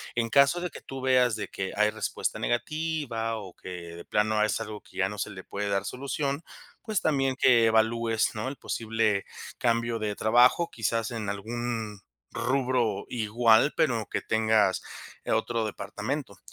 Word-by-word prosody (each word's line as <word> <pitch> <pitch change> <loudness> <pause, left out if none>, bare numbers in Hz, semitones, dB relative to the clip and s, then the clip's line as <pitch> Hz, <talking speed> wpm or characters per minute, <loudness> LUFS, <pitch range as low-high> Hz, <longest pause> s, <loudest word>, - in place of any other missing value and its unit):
En 115 -1 0
caso 140 +7 +5
de 180 - -2
que - - -11
tú 135 0 -7
veas 125 -3 +3
de 105 - -4
que 95 -1 -4
hay 105 0 +4
respuesta 110 - -3
negativa 120 -4 -1
o 95 -4 -8
que 95 - -10 0.3
de 85 - -10
plano 105 0 +2
es 110 - 0
algo 105 -1 -6
que - - -17
ya 95 0 +2
no 105 - -7
se - - -2
le 95 -1 -9
puede 100 0 -3
dar 100 0 0
solución, 140 +3 -2 0.4
pues 215 -4 -1
también 135 -4 +1
que 120 -3 +5
evalúes, 115 0 +2
¿no?, 110 +4 -3
el 140 - -7
posible 110 -3 0 0.4
cambio 115 -1 +1
de 105 -1 -2
trabajo, 120 +11 +4
quizás 115 +1 -1
en 110 -3 -3
algún, 110 0 -4 0.3
rubro 125 -5 0
igual, 115 +3 +3
pero 115 -7 +1
que - - -2
tengas, 110 -3 +2 0.4
eh, - - -3
otro 110 0 0
departamento. 110 +2 -4
115 Hz, 165 wpm, -28 LUFS, 105-125 Hz, 0.4 s, caso